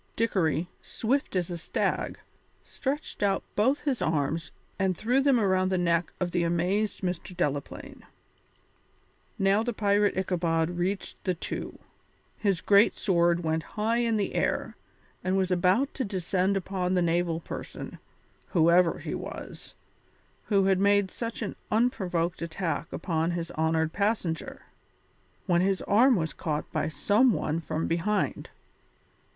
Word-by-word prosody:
Dickory, 180 Hz, -7 st, +1 dB
swift 265 Hz, +1 st, -1 dB
as 180 Hz, -1 st, 0 dB
a 170 Hz, -, -4 dB
stag, -, -, -1 dB, 0.5 s
stretched 280 Hz, -1 st, -4 dB
out 200 Hz, -1 st, +1 dB
both 260 Hz, +7 st, +2 dB
his 275 Hz, -5 st, -1 dB
arms 160 Hz, +1 st, -1 dB, 0.3 s
and 190 Hz, -3 st, +1 dB
threw 250 Hz, +5 st, +2 dB
them 270 Hz, -3 st, +4 dB
around 190 Hz, -3 st, +2 dB
the 190 Hz, -, +1 dB
neck 170 Hz, -1 st, +1 dB
of 180 Hz, -1 st, -1 dB
the 175 Hz, -, +1 dB
amazed 180 Hz, +5 st, 0 dB
Mr. 180 Hz, -1 st, -4 dB
Delaplaine. 145 Hz, -4 st, -3 dB, 1.4 s
Now 195 Hz, +2 st, +3 dB
the 240 Hz, +1 st, -2 dB
pirate 205 Hz, -1 st, +2 dB
Ichabod 170 Hz, -3 st, 0 dB
reached 180 Hz, +3 st, -3 dB
the 185 Hz, -2 st, 0 dB
two; 165 Hz, -, -5 dB, 0.6 s
his 195 Hz, -5 st, 0 dB
great 200 Hz, +1 st, +5 dB
sword 175 Hz, -3 st, +2 dB
went 160 Hz, 0 st, 0 dB, 0.2 s
high 225 Hz, +2 st, +1 dB
in 230 Hz, -2 st, +1 dB
air, 200 Hz, -, -1 dB, 0.5 s
and 185 Hz, +1 st, +1 dB
was 190 Hz, -1 st, +1 dB
about 185 Hz, +10 st, +2 dB
to 265 Hz, -, -2 dB
descend 190 Hz, -1 st, 0 dB
upon 185 Hz, -1 st, -1 dB
the 180 Hz, -, +3 dB
naval 170 Hz, 0 st, +1 dB
person, -, -, -7 dB, 0.5 s
whoever 170 Hz, 0 st, +4 dB
he -, -, -5 dB
was, -, -, -7 dB, 0.7 s
who 200 Hz, -3 st, +3 dB
had 190 Hz, -1 st, +3 dB
made 200 Hz, -1 st, +3 dB
such 230 Hz, -1 st, -4 dB
an 205 Hz, -, -4 dB
unprovoked 185 Hz, -8 st, 0 dB
attack 165 Hz, 0 st, -3 dB
upon 165 Hz, -2 st, -1 dB
his 170 Hz, -1 st, -3 dB
honoured 160 Hz, 0 st, 0 dB
passenger, 200 Hz, -5 st, -1 dB, 0.8 s
when 175 Hz, -2 st, +3 dB
his 190 Hz, 0 st, +1 dB
arm 245 Hz, +5 st, +5 dB
was 160 Hz, -6 st, -1 dB
caught 150 Hz, -2 st, -2 dB
by -, -, 0 dB
some 210 Hz, +9 st, +3 dB
one 155 Hz, -2 st, -1 dB
from 160 Hz, -1 st, -3 dB
behind. 180 Hz, +6 st, -1 dB
185 Hz, 140 wpm, -28 LUFS, 170-205 Hz, 1.4 s, great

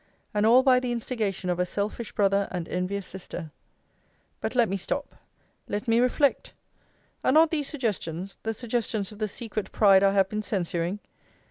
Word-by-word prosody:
And 210 Hz, +1 st, +2 dB
all 250 Hz, +3 st, +7 dB
by 255 Hz, -2 st, +5 dB
the 250 Hz, -1 st, -3 dB
instigation 220 Hz, -5 st, -2 dB
of 175 Hz, -, -2 dB
a -, -, +4 dB
selfish 210 Hz, +4 st, -3 dB
brother, 200 Hz, -1 st, +2 dB
and 175 Hz, -3 st, -4 dB
envious 185 Hz, +2 st, -2 dB
sister 175 Hz, -3 st, -8 dB, 0.9 s
But -, -, -3 dB
let 240 Hz, -2 st, +4 dB
me 195 Hz, -, -2 dB
stop: 195 Hz, -, -3 dB, 0.5 s
let 210 Hz, +4 st, -3 dB
me 230 Hz, 0 st, +4 dB
reflect! 260 Hz, +3 st, +2 dB, 0.7 s
Are -, -, +3 dB
not 315 Hz, +3 st, +5 dB
these 295 Hz, -4 st, -1 dB
suggestions 195 Hz, -, -3 dB
the 225 Hz, 0 st, -3 dB
suggestions 220 Hz, -4 st, -2 dB
of 210 Hz, -, -12 dB
the 215 Hz, -, 0 dB
secret 215 Hz, 0 st, -5 dB
pride 195 Hz, -3 st, +6 dB
I 195 Hz, 0 st, +4 dB
have 195 Hz, -1 st, +4 dB
been 215 Hz, +2 st, -3 dB
censuring? 180 Hz, -2 st, -2 dB
210 Hz, 170 wpm, -27 LUFS, 195-240 Hz, 0.9 s, all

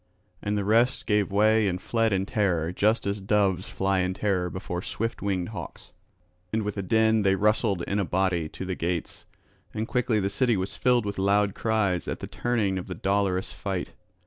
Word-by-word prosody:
And 105 Hz, 0 st, -1 dB
the 100 Hz, -, -1 dB
rest 115 Hz, +4 st, +2 dB
gave 105 Hz, -2 st, +1 dB
way 110 Hz, +1 st, +4 dB
and 90 Hz, -1 st, -1 dB
fled 115 Hz, +3 st, 0 dB
in 95 Hz, -1 st, +1 dB
terror 90 Hz, -6 st, 0 dB
just 105 Hz, +5 st, +1 dB
as 100 Hz, 0 st, -2 dB
doves 95 Hz, -2 st, +1 dB
fly 95 Hz, 0 st, 0 dB
in 90 Hz, 0 st, 0 dB
terror 95 Hz, -4 st, 0 dB
before 90 Hz, -1 st, -4 dB
swift 115 Hz, +4 st, -3 dB
winged 95 Hz, -3 st, -1 dB
hawks. 95 Hz, -6 st, -8 dB, 0.6 s
And 110 Hz, 0 st, 0 dB
with 105 Hz, -1 st, -3 dB
a 100 Hz, -, -2 dB
din 110 Hz, +2 st, +3 dB
they 95 Hz, -1 st, +3 dB
rustled 105 Hz, -2 st, +1 dB
in 100 Hz, +3 st, -1 dB
a -, -, +2 dB
body 90 Hz, -3 st, 0 dB
to 95 Hz, -, -7 dB
the 95 Hz, -, -2 dB
gates; 85 Hz, -1 st, -3 dB, 0.5 s
and 110 Hz, +1 st, -2 dB
quickly 125 Hz, -3 st, +1 dB
the 100 Hz, -, 0 dB
city 120 Hz, +1 st, +2 dB
was 95 Hz, +1 st, -3 dB
filled 125 Hz, -3 st, +2 dB
with 100 Hz, -1 st, -3 dB
loud 100 Hz, +1 st, +2 dB
cries 100 Hz, -6 st, 0 dB
at -, -, -3 dB
the -, -, -5 dB
turning 105 Hz, -6 st, -1 dB
of 90 Hz, -, -8 dB
the 90 Hz, -, -5 dB
dolorous 95 Hz, +1 st, 0 dB
fight. 95 Hz, -3 st, -4 dB
100 Hz, 200 wpm, -26 LUFS, 95-110 Hz, 0.6 s, way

